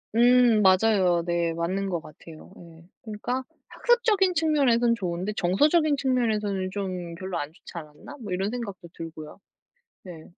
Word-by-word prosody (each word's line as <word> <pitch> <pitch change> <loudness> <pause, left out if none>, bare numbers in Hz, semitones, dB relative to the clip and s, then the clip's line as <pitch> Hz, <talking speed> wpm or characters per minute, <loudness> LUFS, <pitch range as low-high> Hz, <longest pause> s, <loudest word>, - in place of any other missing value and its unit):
음, 240 -2 +5
맞아요. 185 -3 +3
네 170 -1 0
맞는 185 +4 -2
것 175 -3 -1
같아요 155 0 -14
예. 165 0 -15
그러니까 235 +4 -4 0.3
'학습적인 435 -6 +2
측면에서는 275 -8 +3
좋은데 185 0 -3
정서적인 290 - +2
측면에서는 215 -8 0
좀 185 -4 -5
별로 185 +1 -5
안 145 - -4
좋지 165 - -15
않았나?' 155 - -10
뭐, 205 -4 -7
이런 195 +3 -1
생각도 200 -8 -7
들고요. 160 -1 -9 0.6
네, 170 -4 -11
195 Hz, 325 characters per minute, -25 LUFS, 170-245 Hz, 0.6 s, 음